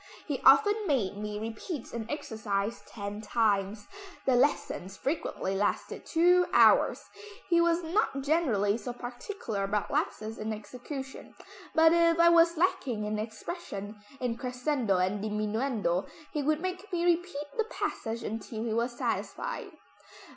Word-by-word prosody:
He 285 Hz, -4 st, -3 dB
often 410 Hz, +10 st, +6 dB
made 235 Hz, -, +1 dB
me 210 Hz, 0 st, -4 dB
repeat 225 Hz, -, -5 dB
an 225 Hz, -2 st, -4 dB
exercise 220 Hz, -5 st, -2 dB
ten 205 Hz, -1 st, -6 dB
times. 205 Hz, -2 st, +1 dB, 0.4 s
The 260 Hz, -, +4 dB
lessons 240 Hz, -7 st, 0 dB
frequently 270 Hz, -, -2 dB
lasted 205 Hz, +1 st, -1 dB
two 355 Hz, +2 st, +4 dB
hours. -, -, +5 dB, 0.5 s
He 340 Hz, -1 st, +5 dB
was 340 Hz, 0 st, +2 dB
not 325 Hz, -5 st, 0 dB
generally 235 Hz, -9 st, +2 dB
so 245 Hz, -, -5 dB
particular 245 Hz, -, -5 dB
about 200 Hz, +1 st, -1 dB
lapses 220 Hz, +1 st, -2 dB
in 220 Hz, +1 st, -2 dB
execution, 260 Hz, +5 st, -8 dB, 0.4 s
but 320 Hz, 0 st, +6 dB
if 335 Hz, -1 st, +4 dB
I 340 Hz, 0 st, +7 dB
was 335 Hz, 0 st, +5 dB
lacking 255 Hz, -, 0 dB
in 210 Hz, 0 st, -2 dB
expression, 220 Hz, -, -6 dB, 0.2 s
in 240 Hz, -2 st, -1 dB
crescendo 250 Hz, -4 st, 0 dB
and 190 Hz, +3 st, 0 dB
diminuendo, 215 Hz, -3 st, -1 dB, 0.3 s
he 300 Hz, -, 0 dB
would 305 Hz, +2 st, +1 dB
make 370 Hz, +2 st, -4 dB
me 345 Hz, -1 st, 0 dB
repeat 345 Hz, -4 st, +1 dB
the 450 Hz, -, +1 dB
passage 230 Hz, -, -3 dB
until 220 Hz, +1 st, -4 dB
he 230 Hz, -2 st, -1 dB
was 240 Hz, +1 st, -1 dB
satisfied." -, -, -3 dB
245 Hz, 140 wpm, -29 LUFS, 210-330 Hz, 0.5 s, I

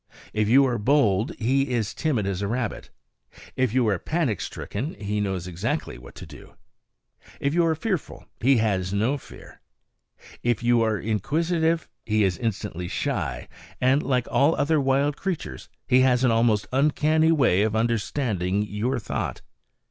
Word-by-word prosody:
If 105 Hz, 0 st, +1 dB
you 135 Hz, +4 st, +6 dB
are 120 Hz, -3 st, -1 dB
bold, 110 Hz, -4 st, +2 dB
he 135 Hz, +4 st, +1 dB
is 115 Hz, -4 st, -1 dB
timid 135 Hz, -11 st, -1 dB
as 100 Hz, -1 st, -2 dB
a 100 Hz, -, -1 dB
rabbit; 120 Hz, +1 st, -3 dB, 0.7 s
if 130 Hz, -3 st, +1 dB
you 125 Hz, -1 st, +2 dB
are 100 Hz, -4 st, +1 dB
panic 155 Hz, -, -1 dB
stricken, 130 Hz, +11 st, -5 dB
he 105 Hz, 0 st, -3 dB
knows 95 Hz, -3 st, -2 dB
exactly 85 Hz, -7 st, -3 dB
what 60 Hz, -, -14 dB
to -, -, -9 dB
do; -, -, -14 dB, 0.8 s
if 140 Hz, +1 st, 0 dB
you 170 Hz, 0 st, +3 dB
are 160 Hz, -, +1 dB
fearful, 185 Hz, 0 st, -4 dB
he 130 Hz, +2 st, +4 dB
has 95 Hz, -5 st, 0 dB
no 115 Hz, +8 st, 0 dB
fear; -, -, -14 dB, 0.8 s
if 120 Hz, -1 st, 0 dB
you 120 Hz, 0 st, +3 dB
are 110 Hz, -2 st, +1 dB
inquisitive, 160 Hz, -, 0 dB, 0.2 s
he 110 Hz, -1 st, +1 dB
is 95 Hz, -2 st, 0 dB
instantly 105 Hz, -6 st, -3 dB
shy; -, -, -3 dB, 0.3 s
and, 130 Hz, +3 st, +3 dB
like 125 Hz, -4 st, 0 dB
all 145 Hz, +4 st, +3 dB
other 150 Hz, +1 st, +2 dB
wild 140 Hz, +2 st, +1 dB
creatures, 170 Hz, -, -5 dB, 0.2 s
he 125 Hz, -, +5 dB
has 130 Hz, -1 st, +3 dB
an 125 Hz, -, +4 dB
almost 115 Hz, -3 st, +2 dB
uncanny 155 Hz, +3 st, +3 dB
way 125 Hz, -, +3 dB
of 110 Hz, 0 st, +1 dB
understanding 110 Hz, -4 st, 0 dB
your 105 Hz, +6 st, -2 dB
thought. 110 Hz, -, -4 dB
120 Hz, 160 wpm, -25 LUFS, 105-140 Hz, 0.8 s, you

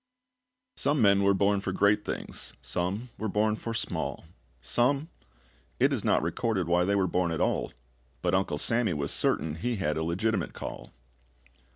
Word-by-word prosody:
Some 145 Hz, +1 st, +1 dB
men 100 Hz, -3 st, +5 dB
were 100 Hz, 0 st, +4 dB
born 100 Hz, +1 st, +2 dB
for 95 Hz, -, -2 dB
great 100 Hz, +2 st, +3 dB
things, -, -, -5 dB
Some 100 Hz, +8 st, -2 dB
were 110 Hz, -, -2 dB
born 105 Hz, +2 st, +2 dB
for 115 Hz, +1 st, -5 dB
small; 115 Hz, -, -3 dB, 0.3 s
Some 125 Hz, -, +1 dB, 0.7 s
it -, -, +4 dB
is -, -, -1 dB
not -, -, +2 dB
recorded 100 Hz, -7 st, -1 dB
Why 90 Hz, +1 st, +3 dB
they 100 Hz, +1 st, +2 dB
were 95 Hz, -2 st, +2 dB
born 90 Hz, 0 st, +1 dB
at 80 Hz, -2 st, -2 dB
all; -, -, 0 dB, 0.5 s
But 90 Hz, -, +1 dB
Uncle 95 Hz, -6 st, +1 dB
Sammy 115 Hz, +1 st, +1 dB
was 70 Hz, -1 st, -2 dB
certain 80 Hz, -, +1 dB
he 120 Hz, +8 st, -1 dB
had 75 Hz, -7 st, -1 dB
a 80 Hz, -, -1 dB
legitimate 95 Hz, +3 st, -1 dB
call. -, -, -7 dB
100 Hz, 170 wpm, -28 LUFS, 85-110 Hz, 0.7 s, men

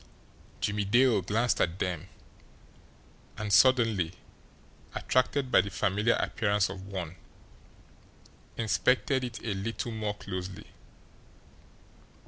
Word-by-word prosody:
Jimmie 100 Hz, 0 st, 0 dB
Dale 120 Hz, +1 st, +4 dB
glanced 105 Hz, +3 st, +1 dB
at 85 Hz, +1 st, 0 dB
them, 90 Hz, -2 st, -3 dB, 1.3 s
and, 105 Hz, -2 st, -2 dB
suddenly 115 Hz, -7 st, +4 dB, 0.8 s
attracted 130 Hz, +1 st, 0 dB
by -, -, +6 dB
the 100 Hz, -, -6 dB
familiar 100 Hz, +5 st, +1 dB
appearance 105 Hz, -4 st, +1 dB
of 95 Hz, 0 st, -8 dB
one, 90 Hz, -4 st, -5 dB, 1.4 s
inspected 125 Hz, +4 st, +1 dB
it 120 Hz, -1 st, -4 dB
a 110 Hz, -, -1 dB
little 115 Hz, +4 st, -4 dB
more 105 Hz, -2 st, -3 dB
closely. 95 Hz, -2 st, -6 dB
105 Hz, 100 wpm, -29 LUFS, 95-115 Hz, 1.4 s, by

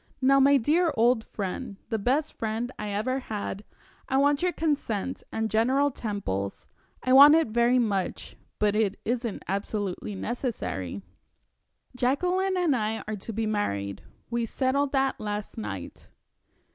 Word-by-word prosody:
Now, 275 Hz, +1 st, +5 dB
my 280 Hz, +1 st, +6 dB
dear 320 Hz, +7 st, +2 dB
old 235 Hz, 0 st, +4 dB
friend 200 Hz, 0 st, -5 dB
the 225 Hz, -, -1 dB
best 270 Hz, +8 st, 0 dB
friend 225 Hz, +2 st, -3 dB
I 210 Hz, -, -3 dB
ever 225 Hz, +6 st, -1 dB
had 210 Hz, -4 st, -5 dB, 0.5 s
I 265 Hz, -, +2 dB
want 285 Hz, +1 st, +3 dB
your 360 Hz, 0 st, +2 dB
consent 275 Hz, -, -2 dB
and 220 Hz, 0 st, -1 dB
General 260 Hz, +6 st, +2 dB
Temple's 190 Hz, -, -4 dB, 0.4 s
I 255 Hz, -, +2 dB
want 285 Hz, +3 st, +10 dB
it 325 Hz, -7 st, +2 dB
very 235 Hz, +3 st, +3 dB
much, 205 Hz, -6 st, -1 dB, 0.2 s
but 210 Hz, -1 st, +2 dB
it 210 Hz, -2 st, +1 dB
isn't 235 Hz, -1 st, -2 dB
absolutely 200 Hz, 0 st, -3 dB
necessary. 100 Hz, -, -4 dB, 0.9 s
Jacqueline 360 Hz, +10 st, +1 dB
and 340 Hz, -6 st, +2 dB
I 220 Hz, -1 st, -1 dB
are 215 Hz, -, -2 dB
to 205 Hz, -, -7 dB
be 225 Hz, +1 st, -2 dB
married. 100 Hz, -, -2 dB, 0.3 s
We 235 Hz, 0 st, 0 dB
settled 270 Hz, +3 st, 0 dB
that 270 Hz, -1 st, +1 dB
last 210 Hz, -1 st, -4 dB
night." 100 Hz, -4 st, -7 dB
230 Hz, 145 wpm, -27 LUFS, 205-270 Hz, 0.9 s, want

